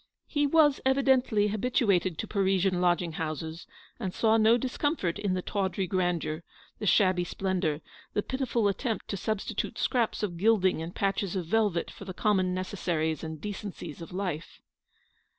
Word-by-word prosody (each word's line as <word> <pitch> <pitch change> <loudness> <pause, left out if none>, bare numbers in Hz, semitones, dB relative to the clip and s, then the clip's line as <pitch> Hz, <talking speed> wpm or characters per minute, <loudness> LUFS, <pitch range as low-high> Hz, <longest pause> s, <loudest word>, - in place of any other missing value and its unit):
He 290 -1 +1
was 295 -2 +4
evidently 260 -5 +3
habituated 200 -6 +1
to - - -4
Parisian 190 -2 +1
lodging 175 -1 +2
houses, 160 +1 -5 0.3
and 190 -6 -4
saw 220 -1 +3
no 225 +1 +5
discomfort 260 - -1
in 195 -3 0
the 180 - -2
tawdry 195 -1 -1
grandeur, 175 -3 -1 0.4
the 210 - -2
shabby 185 -2 +4
splendour, 175 -4 -1 0.3
the 205 - 0
piti 265 +1 -2
ful 230 -4 +1
attempt 220 +2 -2
to - - -1
substitute 215 +2 -2
scraps 235 -4 0
of 175 -5 -2
gilding 190 -4 +3
and 165 +2 -6
patches 195 -1 0
of 180 -3 -2
velvet 205 -1 +1
for 200 - -11
the 185 -2 -7
common 190 -3 +2
necessaries 175 -4 -1
and 160 -2 -6
decencies 190 -6 -6
of 165 - -8
life. 180 -4 -4
190 Hz, 155 wpm, -29 LUFS, 175-220 Hz, 0.4 s, no